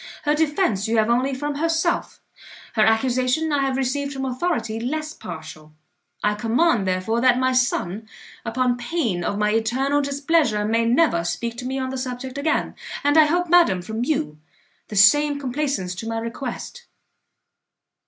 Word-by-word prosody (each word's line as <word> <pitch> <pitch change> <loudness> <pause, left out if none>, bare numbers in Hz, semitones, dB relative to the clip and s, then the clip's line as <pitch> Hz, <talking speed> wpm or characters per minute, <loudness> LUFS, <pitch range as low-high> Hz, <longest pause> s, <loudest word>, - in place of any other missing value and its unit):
Her 295 - +2
defence 295 - +1
you 225 +1 +1
have 220 +1 +3
only 260 +3 +1
from 290 +2 -3
herself, 325 +3 -1 0.5
her 220 - +1
accusation 255 +7 +1
I 285 - +2
have 270 -1 0
received 280 +2 -1
from 270 0 -4
authority 255 -4 -2
less 305 +6 -3
partial. 160 - -10 0.5
I 210 - +2
command, 225 - +1
therefore, 185 +5 0
that 250 -1 +4
my 260 0 +1
son, 220 -4 0 0.4
upon 245 +1 0
pain 240 - -2
of 200 - -2
my 210 0 +1
eternal 255 +6 +1
displeasure, 280 -6 +1
may 230 +2 +1
never 235 - +3
speak 235 +6 -3
to 250 - -6
me 265 +1 -3
on 260 -1 -3
the 265 - -4
subject 255 +1 -5
again, 310 +2 0 0.3
and 290 +1 +3
I 315 -1 +7
hope, 350 +4 0
madam, 335 - +4
from 220 +5 -3
you 155 - -2 0.5
the 210 - -8
same 290 +8 +5
complaisance 265 -8 -2
to 205 +5 -7
my 225 - -2
request. 250 - -6
255 Hz, 165 wpm, -22 LUFS, 220-290 Hz, 0.5 s, I